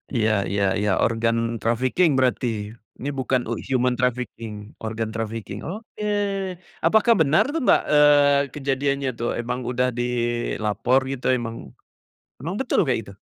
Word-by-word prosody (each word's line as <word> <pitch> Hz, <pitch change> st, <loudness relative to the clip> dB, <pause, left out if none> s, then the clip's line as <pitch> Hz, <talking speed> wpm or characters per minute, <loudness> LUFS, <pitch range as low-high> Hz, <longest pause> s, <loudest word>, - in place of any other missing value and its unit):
Iya 110 Hz, -1 st, +2 dB, 0.2 s
iya 100 Hz, 0 st, +1 dB, 0.2 s
iya, 105 Hz, 0 st, 0 dB
organ 115 Hz, 0 st, +1 dB, 0.3 s
trafficking 130 Hz, +9 st, +2 dB
berarti? 125 Hz, -1 st, +1 dB, 0.5 s
Ini 140 Hz, -, -3 dB
bukan 130 Hz, -1 st, +1 dB, 0.3 s
human 125 Hz, -1 st, +2 dB
trafficking, 125 Hz, -3 st, -2 dB, 0.3 s
organ 110 Hz, 0 st, -3 dB
trafficking. 110 Hz, -2 st, -5 dB
Oke, 210 Hz, +3 st, -7 dB, 0.8 s
apakah 220 Hz, +2 st, +5 dB
benar 155 Hz, +8 st, +4 dB
tuh, 330 Hz, -, -1 dB
Mbak, -, -, +6 dB
eee, 145 Hz, -1 st, +6 dB, 0.2 s
kejadiannya 140 Hz, -1 st, -1 dB
tuh 120 Hz, -, -1 dB
emang 125 Hz, +2 st, -3 dB
udah 125 Hz, +1 st, +1 dB
dilapor 120 Hz, -1 st, 0 dB
gitu 135 Hz, -2 st, -6 dB
emang 115 Hz, -1 st, -5 dB, 0.9 s
emang -, -, -4 dB
betul -, -, 0 dB
kayak -, -, +1 dB
gitu? 100 Hz, -, -12 dB
125 Hz, 130 wpm, -23 LUFS, 115-140 Hz, 0.9 s, Mbak